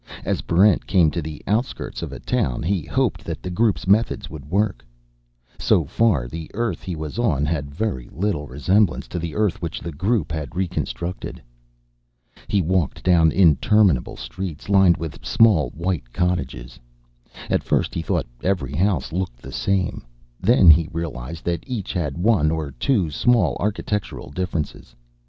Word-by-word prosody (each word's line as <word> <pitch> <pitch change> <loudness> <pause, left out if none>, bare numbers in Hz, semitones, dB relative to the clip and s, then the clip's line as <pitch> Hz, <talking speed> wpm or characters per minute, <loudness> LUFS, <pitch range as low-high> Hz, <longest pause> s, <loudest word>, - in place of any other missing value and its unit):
As - - 0
Barrent 95 +3 +3
came 85 -5 +4
to 85 - -2
the 75 -1 -7
outskirts 115 +5 -2
of - - -5
a - - -7
town, 65 +1 -1
he 90 -1 0
hoped - - 0
that - - -6
the 90 - -4
Group's 100 -3 +1
methods 105 +5 +2
would 75 -3 -9
work. 95 - 0 0.8
So - - +3
far, 95 - +1
the 80 +4 -7
Earth 115 +1 -1
he 90 -3 -5
was 80 +6 -5
on 75 - +2
had 75 -2 -2
very 70 - -3
little 85 -5 -2
resemblance 90 +8 +1
to 90 - -3
the 85 -1 -5
Earth 105 -4 0
which 85 -2 -4
the 85 - -6
Group 90 +1 0
had 80 -3 -5
reconstructed. 90 -1 -3 1.1
He 100 -3 +1
walked 90 -3 0
down 85 -3 +4
interminable 95 - +3
streets 90 -3 -6
lined 95 -4 +5
with 80 -2 -7
small 95 - +4
white 85 -6 -3
cottages. 70 -8 -2 0.7
At - - +1
first, - - 0
he 85 - -2
thought - - -1 0.2
every 85 -9 -1
house 90 +1 0
looked 90 -9 -3
the - - -11
same. 95 -3 -1 0.4
Then 95 -4 +7
he 80 +1 +3
realized 80 -2 -5
that 85 -2 -1
each 120 -7 -4
had 75 -5 -2
one 90 -5 +3
or 80 -3 -2
two 85 - 0
small 95 - +2
architectural 105 -5 -3
differences. 80 -7 -4
85 Hz, 160 wpm, -22 LUFS, 75-100 Hz, 1.1 s, Then